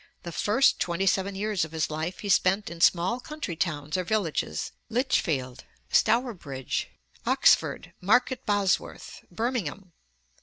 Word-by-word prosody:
The 170 Hz, -, -6 dB
first 210 Hz, +10 st, +3 dB
twenty 175 Hz, +2 st, -1 dB
seven 195 Hz, +1 st, +1 dB
years 205 Hz, -2 st, 0 dB
of 160 Hz, 0 st, -6 dB
his 160 Hz, -1 st, -1 dB
life 160 Hz, +4 st, -4 dB
he 205 Hz, -, -4 dB
spent 195 Hz, 0 st, +2 dB
in 170 Hz, -1 st, -8 dB
small 180 Hz, +8 st, +3 dB
country 295 Hz, -, -6 dB
towns 155 Hz, -2 st, -2 dB
or 185 Hz, -, 0 dB
villages 170 Hz, -, -1 dB, 0.2 s
Lichfield, 160 Hz, -, 0 dB, 0.3 s
Stourbridge, 190 Hz, -, 0 dB, 0.4 s
Oxford, -, -, +3 dB
Market 245 Hz, +7 st, +2 dB
Bosworth, 205 Hz, -2 st, -1 dB
Birmingham. 205 Hz, -, -3 dB
185 Hz, 125 wpm, -27 LUFS, 165-215 Hz, 0.4 s, first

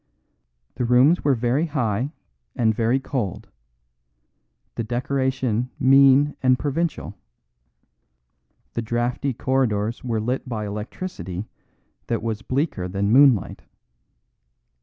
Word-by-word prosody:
The 125 Hz, -, -1 dB
rooms 125 Hz, +8 st, +4 dB
were 140 Hz, -2 st, +3 dB
very 125 Hz, +7 st, 0 dB
high 125 Hz, -3 st, -1 dB, 0.4 s
and 115 Hz, -4 st, +2 dB
very 115 Hz, +4 st, +1 dB
cold; 125 Hz, -8 st, -4 dB, 1.2 s
the 115 Hz, -, -3 dB
decoration 130 Hz, 0 st, -1 dB
mean 135 Hz, +2 st, +5 dB
and 130 Hz, -1 st, +4 dB
provincial; 150 Hz, +5 st, -2 dB, 1.6 s
the 115 Hz, -, -2 dB
draughty 120 Hz, +4 st, -1 dB
corridors 120 Hz, -4 st, -1 dB
were 115 Hz, -3 st, -1 dB
lit 125 Hz, +4 st, -3 dB
by 110 Hz, -3 st, -3 dB
electricity 105 Hz, -, -6 dB, 0.6 s
that 115 Hz, -2 st, -2 dB
was 110 Hz, -2 st, -3 dB
bleaker 130 Hz, -, -2 dB
than 100 Hz, +2 st, -1 dB
moonlight. 130 Hz, -4 st, +4 dB
125 Hz, 100 wpm, -23 LUFS, 110-135 Hz, 1.6 s, mean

